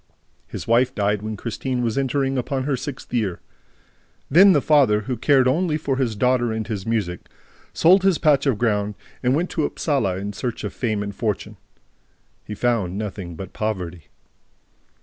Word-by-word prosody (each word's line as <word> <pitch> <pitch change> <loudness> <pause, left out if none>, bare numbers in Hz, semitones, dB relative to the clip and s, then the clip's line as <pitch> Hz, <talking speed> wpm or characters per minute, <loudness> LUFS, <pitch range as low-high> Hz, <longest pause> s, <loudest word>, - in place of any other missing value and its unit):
His - - -7
wife 125 +3 +3
died 105 -1 0
when 110 0 -5
Christine 125 +3 -3
was 115 -2 -1
entering 135 0 0
upon 130 +1 -2
her 140 0 0
sixth 135 -1 -7
year. 105 -7 -1 0.9
Then 190 +7 +8
the 150 - +4
father, 135 -8 +4
who 125 +4 -3
cared 130 +2 +3
only 155 +3 +1
for 140 -4 -2
his 125 -5 0
daughter 125 +1 +2
and 110 0 -3
his 105 -2 -5
music, 100 -7 -2 0.4
sold 185 +4 +5
his 190 -3 +3
patch 145 -3 +3
of 130 -6 +2
ground 105 -2 0 0.3
and 125 +2 +2
went 175 +4 -1
to 160 - -1
Upsala 135 - 0
in 100 +2 -5
search 120 +3 -4
of - - -4
fame 110 -4 -1
and 100 0 -5
fortune. 105 -1 -3 0.9
He 105 - -7
found 105 -6 0
nothing 95 -5 -5
but 95 +4 -8
poverty. 90 -7 -4
120 Hz, 170 wpm, -22 LUFS, 105-135 Hz, 0.9 s, Then